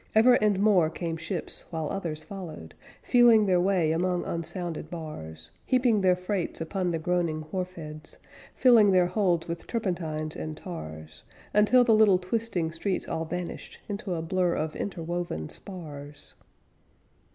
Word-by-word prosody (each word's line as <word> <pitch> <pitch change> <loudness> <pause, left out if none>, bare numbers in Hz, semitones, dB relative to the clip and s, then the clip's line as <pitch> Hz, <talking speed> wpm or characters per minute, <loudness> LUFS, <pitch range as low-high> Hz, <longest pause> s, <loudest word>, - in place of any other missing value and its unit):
Ever, 235 +3 +7
and 210 -4 +3
more, 195 -6 +4
came 165 0 -4
ships, 165 +1 -5
while 160 -2 -3
others 165 -6 -4
followed. 170 - -8 0.3
Feeling 235 -3 +6
their 180 -2 +3
way 180 -4 +2
among 175 +2 0
unsounded 170 -1 -4
bars, 80 - -8
Heaping 245 -5 +2
their 185 -1 +4
freights 180 0 -3
upon 180 +3 -2
the 165 - 0
groaning 165 -1 0
wharf 185 -1 -3
heads, 155 -1 -9 0.4
Filling 235 -5 +6
their 180 -1 +5
holds 175 -3 +1
with 170 0 -5
turpentines 165 -8 -2
and 155 -1 -5
tars, 80 - -8 0.3
Until 210 +5 +5
the 235 -2 +4
little 215 -3 +6
twisting 185 -3 -2
streets 180 +3 -2
all 160 - -2
vanished 175 +2 -6
Into 200 -3 -3
a 160 - -3
blur 180 +1 +1
of 155 0 -2
interwoven 175 - -4
spars. 150 -6 -8
175 Hz, 145 wpm, -27 LUFS, 160-195 Hz, 0.4 s, Ever